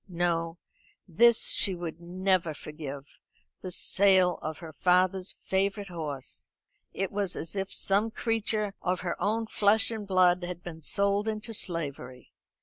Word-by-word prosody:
No; 170 Hz, -1 st, -1 dB, 0.5 s
this 230 Hz, +6 st, +4 dB
she 190 Hz, -, +4 dB
would 170 Hz, -1 st, -6 dB
never 180 Hz, -2 st, 0 dB
forgive 145 Hz, -2 st, -9 dB, 0.4 s
this 180 Hz, -1 st, -4 dB
sale 185 Hz, -3 st, +3 dB
of 155 Hz, -1 st, -4 dB
her 160 Hz, -2 st, -10 dB
father's 185 Hz, +2 st, +2 dB
favourite 195 Hz, +1 st, -1 dB
horse. 150 Hz, -6 st, -5 dB, 0.4 s
It 195 Hz, -1 st, -3 dB
was 200 Hz, -2 st, -2 dB
as 165 Hz, +4 st, -6 dB
if 195 Hz, 0 st, -3 dB
some 200 Hz, +3 st, +3 dB
creature 220 Hz, -3 st, -1 dB
of 180 Hz, 0 st, -1 dB
her 175 Hz, -2 st, -2 dB
own 225 Hz, +2 st, 0 dB
flesh 220 Hz, +1 st, +3 dB
and 215 Hz, -3 st, -5 dB
blood 180 Hz, -1 st, +3 dB
had 175 Hz, 0 st, -6 dB
been 160 Hz, -2 st, -8 dB
sold 200 Hz, +5 st, 0 dB
into 220 Hz, +1 st, -4 dB
slavery. 140 Hz, -, -4 dB
185 Hz, 145 wpm, -28 LUFS, 170-200 Hz, 0.5 s, this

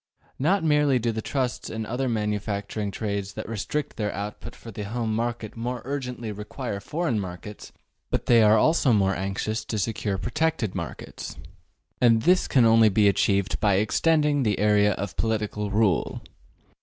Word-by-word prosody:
Not 175 Hz, +7 st, +2 dB
merely 150 Hz, -3 st, +3 dB
do 120 Hz, -1 st, 0 dB
the 110 Hz, 0 st, -3 dB
trusts 130 Hz, 0 st, -2 dB
and 110 Hz, 0 st, -4 dB
other 125 Hz, +4 st, -2 dB
manufacturing 105 Hz, -1 st, -2 dB
trades 100 Hz, -1 st, -3 dB
that -, -, -6 dB
restrict 115 Hz, +7 st, -3 dB
their 105 Hz, -2 st, -1 dB
output 100 Hz, +2 st, -6 dB
for 115 Hz, -, -11 dB
the 105 Hz, 0 st, -7 dB
home 115 Hz, +1 st, -2 dB
market 115 Hz, -1 st, -3 dB
more 120 Hz, +1 st, -4 dB
urgently 125 Hz, -5 st, -4 dB
require 105 Hz, +1 st, -5 dB
foreign 150 Hz, +1 st, -1 dB
markets, 95 Hz, +2 st, -8 dB, 0.4 s
but -, -, -1 dB
they 120 Hz, -2 st, +6 dB
are 110 Hz, 0 st, +6 dB
also 145 Hz, 0 st, +3 dB
more 100 Hz, -2 st, +2 dB
anxious 100 Hz, +3 st, -2 dB
to 110 Hz, -, -3 dB
secure 100 Hz, -1 st, -1 dB
protected 120 Hz, -, -1 dB
markets, -, -, -7 dB, 0.6 s
and 115 Hz, -2 st, +4 dB
this 180 Hz, +5 st, +4 dB
can 125 Hz, -4 st, +4 dB
only 115 Hz, -1 st, +6 dB
be 105 Hz, +1 st, +3 dB
achieved 100 Hz, 0 st, +1 dB
by 100 Hz, -2 st, +3 dB
extending 150 Hz, +8 st, +2 dB
the 105 Hz, -5 st, +1 dB
area 105 Hz, 0 st, +3 dB
of 100 Hz, 0 st, -5 dB
political 105 Hz, -2 st, -1 dB
rule. 100 Hz, -4 st, +1 dB
110 Hz, 160 wpm, -25 LUFS, 105-125 Hz, 0.6 s, they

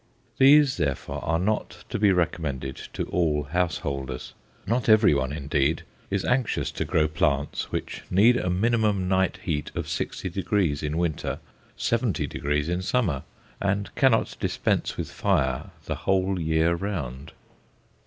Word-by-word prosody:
These, 140 Hz, 0 st, +6 dB
therefore, 70 Hz, -3 st, -2 dB
are 80 Hz, -, +1 dB
not 105 Hz, +5 st, -2 dB
to -, -, -2 dB
be 105 Hz, -1 st, +5 dB
recommended 75 Hz, -7 st, -1 dB, 0.2 s
to -, -, -2 dB
all 75 Hz, -4 st, +1 dB
householders. 70 Hz, -5 st, -2 dB, 0.3 s
Not 115 Hz, +4 st, 0 dB
everyone 75 Hz, -, +5 dB
indeed 75 Hz, +1 st, 0 dB, 0.3 s
is 100 Hz, -1 st, -1 dB
anxious 125 Hz, -1 st, 0 dB
to -, -, -3 dB
grow 75 Hz, -1 st, +2 dB
plants 75 Hz, -1 st, -1 dB
which -, -, -4 dB
need 110 Hz, +7 st, +5 dB
a 90 Hz, -7 st, 0 dB
minimum 105 Hz, 0 st, +1 dB
night 95 Hz, 0 st, +1 dB
heat 75 Hz, -5 st, -2 dB
of -, -, -2 dB
60° 95 Hz, -4 st, -1 dB
in 75 Hz, +1 st, -2 dB
winter, 85 Hz, -3 st, -1 dB, 0.4 s
70° 75 Hz, -, 0 dB
in 90 Hz, +2 st, -1 dB
summer, 95 Hz, -, 0 dB, 0.4 s
and 100 Hz, 0 st, -1 dB
cannot -, -, +2 dB
dispense -, -, 0 dB
with -, -, -4 dB
fire 65 Hz, -2 st, 0 dB, 0.2 s
the -, -, -2 dB
whole 95 Hz, -1 st, +1 dB
year 80 Hz, +1 st, +2 dB
round. 80 Hz, -8 st, -4 dB
85 Hz, 135 wpm, -26 LUFS, 75-100 Hz, 0.4 s, These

